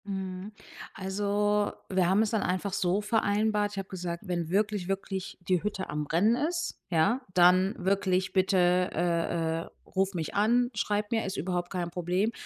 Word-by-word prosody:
Mhm. 190 Hz, 0 st, -5 dB, 0.4 s
Also, 205 Hz, +2 st, 0 dB, 0.2 s
wir 185 Hz, -2 st, +2 dB
haben 195 Hz, +3 st, +4 dB
es 220 Hz, -, -1 dB
dann 220 Hz, -, +1 dB
einfach 185 Hz, +2 st, -1 dB
so 185 Hz, +2 st, +1 dB
vereinbart: 210 Hz, -1 st, +1 dB
Ich -, -, -8 dB
habe 195 Hz, -1 st, -4 dB
gesagt, 175 Hz, 0 st, -5 dB
wenn 175 Hz, -3 st, -2 dB
wirklich, 205 Hz, -1 st, 0 dB
wirklich 195 Hz, -1 st, -4 dB
die 180 Hz, -3 st, +2 dB
Hütte 205 Hz, -2 st, -3 dB
am 150 Hz, 0 st, -3 dB
rennen 200 Hz, +10 st, +3 dB
ist, 335 Hz, +5 st, -2 dB
ja, 175 Hz, +10 st, +2 dB
dann 185 Hz, +2 st, +5 dB
wirklich 190 Hz, -1 st, 0 dB
bitte, 190 Hz, 0 st, +2 dB, 0.3 s
äh, 165 Hz, -1 st, 0 dB
äh, -, -, -8 dB, 0.3 s
ruf 190 Hz, +1 st, +1 dB
mich 165 Hz, -4 st, -3 dB
an, 240 Hz, +4 st, +3 dB
schreib 205 Hz, -1 st, -1 dB
mir, 225 Hz, -1 st, +1 dB
ist 190 Hz, -, -4 dB
überhaupt 175 Hz, -1 st, -2 dB
kein 175 Hz, -2 st, -3 dB
Problem. 180 Hz, +5 st, 0 dB
190 Hz, 170 wpm, -29 LUFS, 180-205 Hz, 0.4 s, dann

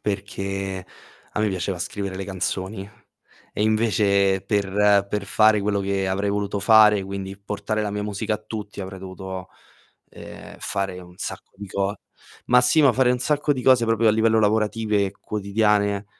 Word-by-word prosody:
perché, 95 Hz, -2 st, -4 dB, 0.5 s
a -, -, -2 dB
me 105 Hz, -, +2 dB
piaceva 95 Hz, -1 st, -3 dB
scrivere 95 Hz, +2 st, -4 dB
le 95 Hz, -, -4 dB
canzoni, 95 Hz, +1 st, -4 dB, 0.6 s
e -, -, -2 dB
invece 105 Hz, -3 st, +2 dB
per 100 Hz, -1 st, +2 dB
per 105 Hz, 0 st, -2 dB
fare 110 Hz, +1 st, +4 dB
quello 100 Hz, 0 st, 0 dB
che 95 Hz, -1 st, -1 dB
avrei 100 Hz, +2 st, 0 dB
voluto 100 Hz, 0 st, -2 dB
fare, 105 Hz, -2 st, +6 dB
quindi 95 Hz, 0 st, -6 dB
portare 105 Hz, +2 st, -3 dB
la 105 Hz, -, -2 dB
mia 105 Hz, 0 st, -3 dB
musica 105 Hz, +1 st, -2 dB
a -, -, -5 dB
tutti, 105 Hz, -2 st, -7 dB
avrei 95 Hz, 0 st, -7 dB
dovuto, 95 Hz, 0 st, -7 dB, 0.6 s
ehm, -, -, -11 dB
fare 95 Hz, -2 st, -3 dB
un 90 Hz, 0 st, -15 dB
sacco -, -, -7 dB
di 100 Hz, +1 st, -8 dB
co 100 Hz, +2 st, -2 dB, 0.5 s
ma 125 Hz, 0 st, +5 dB
sì, 125 Hz, +5 st, +4 dB
ma 140 Hz, -, +6 dB
fare 130 Hz, 0 st, +3 dB
un 125 Hz, -, -1 dB
sacco 145 Hz, +2 st, +1 dB
di 130 Hz, -, -4 dB
cose 125 Hz, -3 st, +5 dB
proprio 115 Hz, 0 st, +3 dB
a -, -, +7 dB
livello 110 Hz, +1 st, +3 dB
lavorative 105 Hz, -1 st, +1 dB
e 95 Hz, -, -6 dB
quotidiane 100 Hz, -1 st, 0 dB
100 Hz, 170 wpm, -23 LUFS, 95-110 Hz, 0.6 s, a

